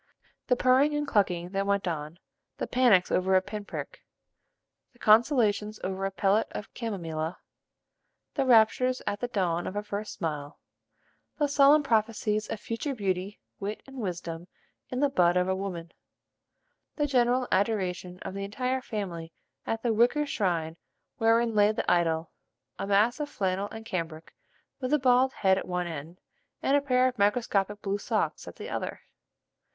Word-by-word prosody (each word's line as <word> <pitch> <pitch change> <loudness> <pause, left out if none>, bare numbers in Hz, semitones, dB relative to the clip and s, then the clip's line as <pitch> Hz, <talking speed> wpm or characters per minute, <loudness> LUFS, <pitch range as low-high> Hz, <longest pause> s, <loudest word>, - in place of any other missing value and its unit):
The 250 - +4
purring 260 +4 +3
and 295 -1 -1
clucking 180 -7 +1
that 195 +1 -2
went 200 -1 +1
on; 155 -1 -4 0.4
the - - -2
panics 235 -8 +4
over 190 +1 +2
a 185 - +5
pin 205 +1 -6
prick; - - -7 0.9
the - - -24
consultations 215 -2 +3
over 190 +1 -2
a 195 - -1
pellet 200 +3 +2
of 205 - -7
chamomilla; 170 -7 -4 1.0
the 275 -3 0
raptures 250 +2 +4
at 205 - -2
the 245 - -2
dawn 175 -7 -1
of 185 - -5
a 205 - -2
first 210 +1 -5
smile; 150 -3 -4 0.8
the 295 - +2
solemn 285 +1 +5
prophecies 215 -3 0
of 220 - -4
future 235 +6 -3
beauty, 195 -2 -2 0.2
wit, 205 +2 -5
and 270 0 -12
wisdom 175 -5 -5 0.4
in 255 +1 -2
the 285 - +4
bud 180 -9 +3
of 180 0 +2
a 190 - +1
woman; 180 -4 -5 1.0
the 295 - +1
general 250 -2 +2
adoration 185 -3 0
of - - -5
the 200 0 -4
entire 255 +6 -2
family 180 -9 -5 0.4
at 225 0 -2
the 235 -2 +2
wicker 245 +7 +3
shrine 170 - -1 0.4
wherein 230 +1 +3
lay 210 0 +5
the 215 - -3
idol, 165 -2 +1 0.5
a - - -3
mass 210 +7 +3
of 295 -1 -3
flannel 195 -1 -1
and 225 0 -9
cambric 165 -6 -5 0.5
with 255 -1 -3
a - - +6
bald 255 0 +4
head 190 -6 +2
at - - -7
one 180 -1 -1
end, 165 +1 -7 0.4
and 275 - +3
a 285 - +4
pair 255 -2 +3
of 250 -3 -4
microscopic 205 -1 +1
blue 200 0 -1
socks - - -2
at - - -9
the - - -8
other. - - -4
205 Hz, 165 wpm, -28 LUFS, 185-245 Hz, 1.0 s, a